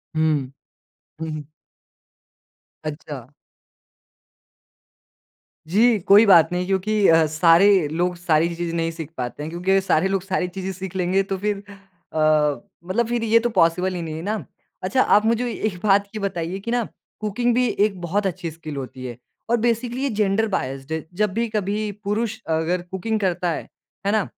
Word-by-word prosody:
हुँ। 155 Hz, -4 st, +1 dB, 0.7 s
हुँ, 160 Hz, -, -3 dB
हुँ। 155 Hz, -1 st, -5 dB, 1.4 s
अच्छा। 145 Hz, -4 st, -7 dB, 2.4 s
जी, 220 Hz, +4 st, +4 dB
कोई 200 Hz, +4 st, +6 dB
बात 175 Hz, -6 st, +7 dB
नहीं 180 Hz, 0 st, -1 dB
क्योंकि 195 Hz, +2 st, +2 dB
अ, 165 Hz, 0 st, +6 dB
सारे 165 Hz, +3 st, +5 dB
लोग 175 Hz, +4 st, -1 dB
सारी 170 Hz, -1 st, +1 dB
चीज़ें 170 Hz, 0 st, -3 dB
नहीं 165 Hz, 0 st, 0 dB
सीख 160 Hz, -2 st, -7 dB
पाते 125 Hz, +3 st, -4 dB
हैं, 155 Hz, -, -4 dB
क्योंकि 180 Hz, +3 st, +1 dB
सारे 190 Hz, -2 st, +2 dB
लोग 195 Hz, -1 st, 0 dB
सारी 190 Hz, -1 st, -1 dB
चीज़ें 190 Hz, +1 st, -5 dB
सीख 190 Hz, 0 st, -7 dB
लेंगे 185 Hz, +1 st, +2 dB
तो 195 Hz, 0 st, -3 dB
फिर 205 Hz, +1 st, -2 dB, 0.5 s
अ, 160 Hz, -, -1 dB, 0.7 s
मतलब 220 Hz, +6 st, 0 dB
फिर 240 Hz, -1 st, -1 dB
ये 230 Hz, 0 st, +4 dB
तो 240 Hz, +1 st, 0 dB
पॉसिबल 185 Hz, -2 st, +2 dB
ही 175 Hz, -, -3 dB
नहीं 160 Hz, -2 st, -5 dB
है 160 Hz, -, -5 dB
ना? 210 Hz, +4 st, -3 dB, 0.4 s
अच्छा, 195 Hz, +8 st, +2 dB
आप 210 Hz, -3 st, +4 dB
मुझे 230 Hz, +2 st, +1 dB
एक 215 Hz, -4 st, -2 dB
बात 200 Hz, -1 st, +4 dB
ये -, -, -2 dB
बताइए 185 Hz, -1 st, -3 dB
कि 230 Hz, +4 st, -5 dB
ना 240 Hz, 0 st, +1 dB, 0.4 s
कुकिंग 225 Hz, +3 st, 0 dB
भी 250 Hz, 0 st, +3 dB
एक 205 Hz, -3 st, 0 dB
बहुत 195 Hz, +4 st, 0 dB
अच्छी 170 Hz, -2 st, -4 dB
स्किल 155 Hz, -2 st, -8 dB
होती 130 Hz, -1 st, -7 dB
है। 120 Hz, -2 st, -6 dB, 0.3 s
और 235 Hz, -, +3 dB
बेसिकली 240 Hz, +2 st, 0 dB
ये 280 Hz, -, +1 dB
जेंडर 210 Hz, 0 st, +1 dB
बायस्ड 135 Hz, -7 st, -3 dB
है, 160 Hz, -1 st, -3 dB
जब 210 Hz, +1 st, 0 dB
भी 230 Hz, +3 st, 0 dB
कभी 210 Hz, 0 st, -1 dB
पुरुष 215 Hz, +2 st, -1 dB, 0.2 s
अगर 170 Hz, +3 st, 0 dB
कुकिंग 190 Hz, +5 st, -3 dB
करता 180 Hz, -3 st, 0 dB
है, -, -, -3 dB, 0.4 s
है 200 Hz, -, +2 dB
ना? 215 Hz, -1 st, +2 dB
190 Hz, 170 wpm, -22 LUFS, 165-210 Hz, 2.4 s, बात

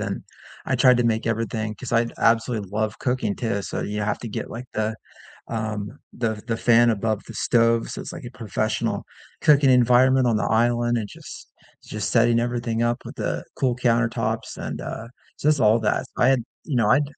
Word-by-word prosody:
and -, -, -3 dB, 0.4 s
I 130 Hz, -, 0 dB
tried 125 Hz, 0 st, +6 dB
to 120 Hz, -, +1 dB
make 115 Hz, -1 st, 0 dB
everything 110 Hz, -1 st, -2 dB
'cause 125 Hz, -, -7 dB
I 115 Hz, 0 st, +3 dB
absolutely 115 Hz, -3 st, +1 dB
love 110 Hz, +1 st, -1 dB
cooking 125 Hz, -5 st, -1 dB
too, 115 Hz, -4 st, -1 dB
so -, -, -4 dB
you 105 Hz, +1 st, -3 dB
have 105 Hz, 0 st, -1 dB
to 115 Hz, -, -6 dB
get, -, -, -5 dB
like, 120 Hz, +2 st, -6 dB
the, 110 Hz, 0 st, -1 dB, 0.5 s
um, 110 Hz, +1 st, -4 dB, 0.2 s
the 110 Hz, -3 st, -2 dB
the 115 Hz, -1 st, -1 dB
fan 120 Hz, 0 st, +5 dB
above 110 Hz, -1 st, -1 dB
the -, -, -7 dB
stove. 115 Hz, 0 st, +2 dB
So, -, -, -6 dB
it's -, -, -7 dB
like -, -, -8 dB
a 120 Hz, -, -10 dB
professional 110 Hz, -5 st, -2 dB, 0.4 s
cooking 145 Hz, -2 st, +5 dB
environment 125 Hz, +1 st, +5 dB
on 115 Hz, -, +2 dB
the -, -, -1 dB
island 120 Hz, +1 st, +2 dB
and 110 Hz, -3 st, -3 dB
just -, -, -11 dB, 0.4 s
just 105 Hz, -1 st, -4 dB
setting 115 Hz, 0 st, +4 dB
everything 120 Hz, -1 st, -1 dB
up 120 Hz, 0 st, +1 dB
with -, -, -8 dB
the -, -, -3 dB
cool 130 Hz, -3 st, +1 dB
countertops 120 Hz, -1 st, 0 dB
and, -, -, -5 dB
uh, 115 Hz, -, -6 dB, 0.3 s
just 150 Hz, -1 st, +2 dB
all 110 Hz, +2 st, +5 dB
that. 105 Hz, -1 st, 0 dB
I 125 Hz, -, +4 dB
had 135 Hz, -, +4 dB, 0.3 s
you 150 Hz, -, -3 dB
know, 115 Hz, -4 st, +3 dB
I'd 140 Hz, +5 st, +5 dB
115 Hz, 195 wpm, -23 LUFS, 110-120 Hz, 0.5 s, tried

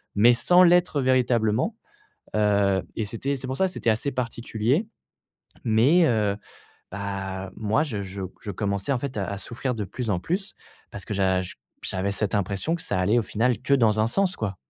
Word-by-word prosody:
mais 115 Hz, +4 st, +6 dB
sans 180 Hz, +9 st, +5 dB
l'être 175 Hz, -4 st, +4 dB
véritablement, 125 Hz, -, +2 dB, 0.6 s
heu, 100 Hz, -2 st, +3 dB
et 110 Hz, -, -1 dB
c'était 125 Hz, +6 st, -3 dB
c'est 130 Hz, 0 st, -7 dB
pour 130 Hz, -, -3 dB
ça 190 Hz, -, +2 dB
que -, -, -3 dB
c'était 115 Hz, -, 0 dB
assez 110 Hz, +6 st, 0 dB
particulier 125 Hz, -, -1 dB, 0.8 s
mais 130 Hz, +11 st, +4 dB
heu, 105 Hz, -5 st, +1 dB, 0.6 s
bah 95 Hz, -1 st, -4 dB
moi 110 Hz, +6 st, +1 dB
je 110 Hz, -10 st, -4 dB
je 95 Hz, 0 st, -6 dB, 0.2 s
je 105 Hz, -, -5 dB
commençais 100 Hz, +3 st, -1 dB
en 130 Hz, -, +1 dB
fait 130 Hz, -1 st, -5 dB
à 100 Hz, -2 st, -1 dB
à 100 Hz, -, -4 dB
souffrir 120 Hz, +4 st, -3 dB
de 105 Hz, -, -2 dB
plus 115 Hz, +4 st, -4 dB
en 90 Hz, -, +1 dB
plus 195 Hz, -, -3 dB, 0.4 s
parce 100 Hz, -, -7 dB
que 105 Hz, -, -4 dB
j'a 95 Hz, -1 st, +2 dB, 0.4 s
j'avais 95 Hz, +1 st, -1 dB
cette 100 Hz, -1 st, -1 dB
impression 100 Hz, -, 0 dB
que 170 Hz, -, -4 dB
ça 100 Hz, -, -1 dB
allait 105 Hz, +6 st, +3 dB
au -, -, +2 dB
final 115 Hz, +1 st, 0 dB
que 140 Hz, -, -1 dB
dans 110 Hz, -4 st, +3 dB
un 110 Hz, -, +3 dB
sens, 195 Hz, +7 st, 0 dB
quoi. 100 Hz, -3 st, -3 dB
110 Hz, 190 wpm, -25 LUFS, 100-130 Hz, 0.8 s, mais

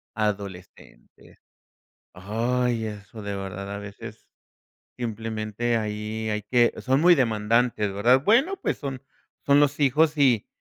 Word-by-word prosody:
a 110 Hz, -1 st, +1 dB
adolescentes. 100 Hz, -3 st, -9 dB, 0.7 s
Ay, 115 Hz, +4 st, -1 dB
eso 105 Hz, 0 st, -8 dB
de 100 Hz, -1 st, -4 dB
verdad, 100 Hz, 0 st, -6 dB
a 100 Hz, -, -5 dB
veces, 100 Hz, -1 st, -10 dB, 0.7 s
simplemente, 115 Hz, 0 st, -3 dB
ahí 110 Hz, 0 st, -3 dB
hay 105 Hz, 0 st, -2 dB
que 120 Hz, +3 st, +3 dB
son 135 Hz, +2 st, +2 dB
muy 175 Hz, +1 st, +6 dB
demandantes, 115 Hz, -3 st, +1 dB
¿verdad? 120 Hz, +7 st, +3 dB
Bueno, 265 Hz, -, +3 dB
pues -, -, -1 dB
son 135 Hz, -3 st, -6 dB, 0.4 s
son 140 Hz, 0 st, +4 dB
los 145 Hz, 0 st, +2 dB
hijos 150 Hz, +3 st, +3 dB
y 130 Hz, -7 st, +3 dB
115 Hz, 130 wpm, -25 LUFS, 105-130 Hz, 0.7 s, muy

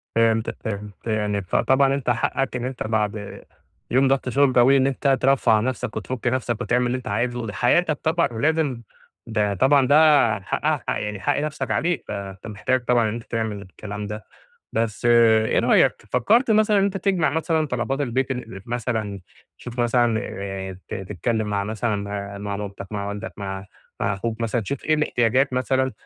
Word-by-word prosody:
فهِمتَك 115 Hz, -1 st, +2 dB
فهِمت، 105 Hz, 0 st, -6 dB
يعني، 105 Hz, -2 st, 0 dB
فطبعًا 135 Hz, +8 st, +2 dB
أنتَ 140 Hz, -3 st, -2 dB
حقَّك 130 Hz, +2 st, 0 dB
إن 125 Hz, 0 st, -3 dB
أنتَ 130 Hz, -1 st, -4 dB
بعد 105 Hz, -2 st, -2 dB, 0.5 s
يوم 130 Hz, +2 st, +4 dB
ضغط 135 Hz, -1 st, +1 dB
شغل 135 Hz, +1 st, +3 dB
طويل، 125 Hz, +3 st, +5 dB
إن 130 Hz, -, +3 dB
أنتَ 135 Hz, 0 st, +1 dB
ترفّه 135 Hz, -2 st, +3 dB
عن 110 Hz, -1 st, +4 dB
نفسَك 130 Hz, -2 st, -3 dB
وتفك 125 Hz, +3 st, -4 dB
نفسَك 120 Hz, -2 st, -1 dB
وتعمَل 125 Hz, 0 st, +1 dB
اللي 125 Hz, +1 st, -1 dB
أنتَ 125 Hz, -1 st, -9 dB
عايزه، 120 Hz, +3 st, -1 dB
دي 100 Hz, -, -5 dB
حياتَك 150 Hz, -, +2 dB
طبعًا، 165 Hz, +2 st, +2 dB
ولازم 145 Hz, 0 st, 0 dB, 0.5 s
ده 105 Hz, -2 st, 0 dB
طبعًا 135 Hz, +7 st, +4 dB
ده 145 Hz, -7 st, +5 dB
حقها 145 Hz, +8 st, -1 dB
ح -, -, 0 dB
يعني 105 Hz, -1 st, -4 dB
حق 140 Hz, +9 st, 0 dB
نفسَك 155 Hz, +1 st, -3 dB
عليك. 175 Hz, +1 st, 0 dB
فأنتَ 95 Hz, 0 st, -6 dB
محتاج 120 Hz, +4 st, -1 dB
طبعًا 120 Hz, -3 st, +3 dB
إن -, -, -3 dB
أنتَ 115 Hz, 0 st, -6 dB
تعمل 110 Hz, -2 st, -3 dB
الكلام 105 Hz, +2 st, -7 dB
ده. 105 Hz, +1 st, -7 dB, 0.5 s
بس 115 Hz, -1 st, -1 dB
إيه 115 Hz, -2 st, +5 dB
رأيك؟ -, -, +4 dB, 0.2 s
فكَّرت 225 Hz, -, +3 dB
مثلًا 215 Hz, -1 st, +4 dB
إن -, -, +3 dB
أنتَ 195 Hz, 0 st, 0 dB
تجمَع 185 Hz, -4 st, +1 dB
مثلًا 160 Hz, 0 st, 0 dB
طلبات 130 Hz, +2 st, -2 dB
البيت، 130 Hz, 0 st, -1 dB
ال 125 Hz, -5 st, -5 dB
ال -, -, -10 dB
مثلًا 110 Hz, -4 st, -3 dB, 0.4 s
تشوف 125 Hz, 0 st, -8 dB
مثلًا، 120 Hz, -1 st, +2 dB
آآ، 95 Hz, -1 st, -6 dB
تتكلَّم 105 Hz, +3 st, -2 dB
مع 100 Hz, -1 st, -1 dB
مثلًا 110 Hz, +1 st, -1 dB, 0.4 s
مع 100 Hz, 0 st, -4 dB
مامتَك، 100 Hz, -1 st, -6 dB
مع 100 Hz, -1 st, -3 dB
والدَك، 100 Hz, -3 st, -5 dB
مع 95 Hz, -1 st, -4 dB, 0.4 s
ةمع -, -, +1 dB
أخوك، 110 Hz, +3 st, -4 dB
مثلًا 115 Hz, +1 st, 0 dB
تشوف 130 Hz, +6 st, -5 dB
إيه 155 Hz, -, +3 dB
الاحتياجات 130 Hz, -2 st, +1 dB
مثلًا 130 Hz, +1 st, +1 dB
120 Hz, 175 wpm, -23 LUFS, 105-135 Hz, 0.5 s, طويل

